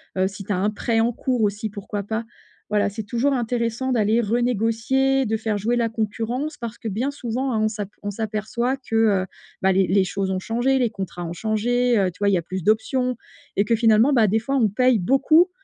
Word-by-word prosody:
heu, 190 0 +2
si 195 +1 -8
tu 200 - -6
as 180 - 0
un 205 +3 +1
prêt 225 +2 -1
en 235 +2 +2
cours 250 0 -1
aussi, 210 +1 0
pourquoi 205 0 -5
pas. 220 +3 -3 0.5
Voilà 210 -1 +2
c'est 215 +2 -6
toujours 240 +6 0
intéressant 240 +1 -1
d'aller 225 -1 +2
renégocier, 245 +4 +1
de 220 0 0
faire 220 -1 -1
jouer 225 +4 0
la 235 -1 +1
concurrence, 225 +6 -3
parce 235 -1 -6
que 225 - -7
bien 230 +7 -1
souvent 255 0 -3
hein, 220 - 0
on - - +3
s'ap 210 -2 -4
on 205 - -2
s'aperçoit 220 +4 -2
que, 255 -4 -6 0.3
heu, - - -5 0.4
bah, 190 - +4
les 190 0 +3
les 195 +2 +3
choses 190 +1 -2
ont 190 0 -1
changé. 240 +6 +1
Les 245 -4 +1
contrats 190 -4 -6
ont 170 - -5
changé, 235 +5 +1
heu, 190 -2 +2
tu 180 - -22
vois? 205 - +2
Il 200 - +2
y - - +4
a - - -1
plus 185 +2 -5
d'options 250 +4 +1 0.4
et 200 - +2
que 230 - +2
finalement 225 +4 +4
bah, 230 -5 +4
des 215 +3 +2
fois 270 +5 -2
on 230 -6 +3
paye 250 +1 +3
beaucoup, 280 - +4
225 Hz, 230 wpm, -23 LUFS, 205-245 Hz, 0.5 s, bah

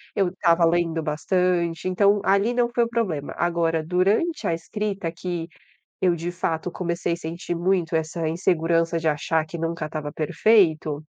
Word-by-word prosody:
eu 195 -2 +2
estava 170 -2 +3
lendo 165 -1 +1
bastante, 170 +3 0
então, 200 +2 +3
ali 200 +5 +3
não 240 -1 +1
foi 240 - +3
o 230 - -2
problema. 190 -12 -2
Agora 170 -2 +1
durante 195 - +1
a - - +1
escrita 195 +2 -3
que, 170 0 -4 0.5
eu 180 -2 +3
de 170 +1 -4
fato 170 -1 -2
comecei 170 -1 -2
sentir 170 +1 -5
muito 175 -1 0
essa 160 +1 -1
insegurança 165 -1 +1
de 160 - -1
achar 160 +1 0
que 165 +2 -7
nunca 165 -1 -3
estava 155 -1 -5
perfeito, 160 -4 +2
170 Hz, 155 wpm, -24 LUFS, 165-185 Hz, 0.5 s, estava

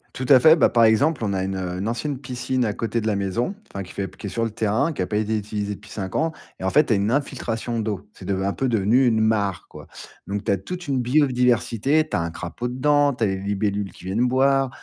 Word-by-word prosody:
Tout 130 - -4
à 135 -3 +8
fait, 155 +6 +7
bah, - - +4
par 115 -1 +4
exemple, 115 +4 +2
on 100 - -1
a 95 -1 -1
une, 95 0 -3
heu, 90 -1 -4
une 100 +4 -2
ancienne 135 +4 -3
piscine, 125 0 -2
à 110 - 0
côté 115 +2 -2
de 110 - -3
la 105 -2 +1
maison, 100 - -1 0.2
enfin, 100 - -5
qui 90 - -12
fait 100 - -3
p - - -16
qui 105 - -6
est - - -4
sur 115 +3 -1
le 115 - -1
terrain, 110 +9 0
qui - - -4
a 90 - -1
pas 105 - -1
été 110 +1 0
utilisée 105 0 -3
depuis 105 +2 -16
5 95 -3 -5
ans 160 +1 +1 0.3
et - - -5
en 95 - +1
fait, 150 +9 +4
tu 115 - +1
as - - +3
une 100 +3 0
infiltration 120 -4 -2
d'eau. 105 -2 -4
C'est - - -14
deve 95 +1 -1
un 100 - 0
peu 135 - -1
devenu 115 +4 +3
une 110 -2 +2
mare 105 -4 0
quoi, - - -12 0.4
donc, 100 0 -4
tu - - +1
as - - 0
toute 175 - -7
une 135 -2 0
biodiversité, 125 +1 +2
tu - - -3
as - - +1
un 85 0 -3
crapaud 90 +9 -5
dedans, 145 +3 +2
tu 120 -3 0
as - - +2
les 95 -1 -1
libellules 100 0 -2
qui 90 - -15
viennent 105 +6 +1
boire, 135 +1 +2
110 Hz, 280 wpm, -23 LUFS, 100-130 Hz, 0.4 s, à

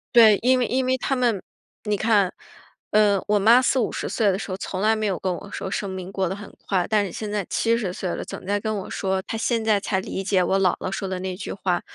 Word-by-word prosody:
对， 220 -4 +8
因 255 +1 +4
为 245 - +1
因 255 +1 0
为 260 0 +1
她 270 - -1
们 240 -6 +1 0.4
你 210 0 +1
看， 205 -3 +2 0.6
呃， 205 -2 +4
我 210 0 +4
妈 230 +5 +6
40，50 255 -3 0
岁 220 -3 +2
的 190 - +1
时 200 - -6
候， 185 - -3
从 190 -1 -4
来 215 +2 +4
没 215 -1 -1
有 195 -3 0
跟 185 -1 -1
我 195 - -8
说 190 - -4
生 200 - -2
命 190 0 -6
过 190 -1 -1
得 190 - -3
很 205 0 -11
快， 185 -3 +1
但 210 -1 +3
是 185 - -7
现 215 -1 -5
在 205 -3 -1
70 230 -5 0
岁 185 -1 -4
了， - - -4
总 - - -8
在 205 +1 0
跟 215 +1 -2
我 190 - -7
说， 190 -1 -1
她 225 - -5
现 230 0 0
在 215 -2 +3
才 190 -1 -1
理 190 - -4
解 190 -1 +2
我 195 +2 +1
姥 185 -2 +3
姥 185 - -4
说 195 0 -3
的 185 -1 -3
那 185 -1 -3
句 195 - -5
话。 180 -3 -1
200 Hz, 270 characters per minute, -24 LUFS, 190-220 Hz, 0.6 s, 对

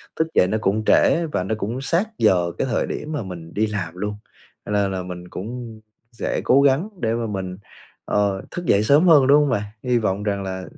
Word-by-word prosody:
thức 160 - 0
dậy 90 - +4
nó 105 +4 0
cũng 105 +2 0
trễ 170 +9 +4
và 125 - -2
nó 95 +4 -2
cũng 115 +5 -3
sát 170 +9 0
giờ 85 -2 +3
cái - - -1
thời - - 0
điểm 150 - -5
mà 150 -7 -3
mình 85 -3 -9
đi 110 +1 +1
làm 95 -6 -4
luôn. 105 +3 -3 0.5
Cho - - -6
nên 100 -1 +1
là 95 -1 -3
mình 90 -1 -8
cũng 115 +4 -7 0.3
sẽ 115 - -3
cố 135 +2 +4
gắng 140 +8 +2
để 115 -1 +1
mà 115 -1 -2
mình, 95 -3 -4 0.5
ờ, 100 -2 0
thức 175 - -5
dậy 100 -7 +3
sớm 145 +10 +4
hơn, 145 -6 +6
đúng 145 +2 +6
hông 145 - 0
bạn? 105 -5 0 0.2
Hy 125 -1 +2
vọng 105 -3 -1
rằng 100 -1 -1
là 95 -1 -5
105 Hz, 230 wpm, -22 LUFS, 95-130 Hz, 0.5 s, hơn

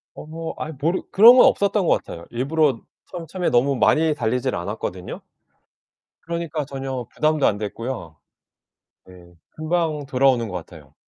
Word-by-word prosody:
어 160 +1 -7
아이 155 - -5
모르 165 +6 0
그런 230 +5 +8
건 - - +8
없었던 200 -1 +1
것 - - +4
같아요. 85 - -10
일부러 135 +1 +1 0.3
첨 170 -3 -7
처음에 180 +2 -2
너무 135 +3 +2
많이 155 +4 +3
달리질 120 -4 -1
않았거든요. 90 0 -5 1.1
그러니까 165 -3 -3
전혀 135 -3 -5
부담도 155 -2 +2
안 105 - 0
됐고요. 105 -5 -6 0.9
예. 90 -1 -16 0.2
금방 155 -2 -2
돌아오는 130 -3 +2
것 95 - -8
같아요. 80 -4 -11
135 Hz, 315 characters per minute, -22 LUFS, 110-160 Hz, 1.1 s, 그런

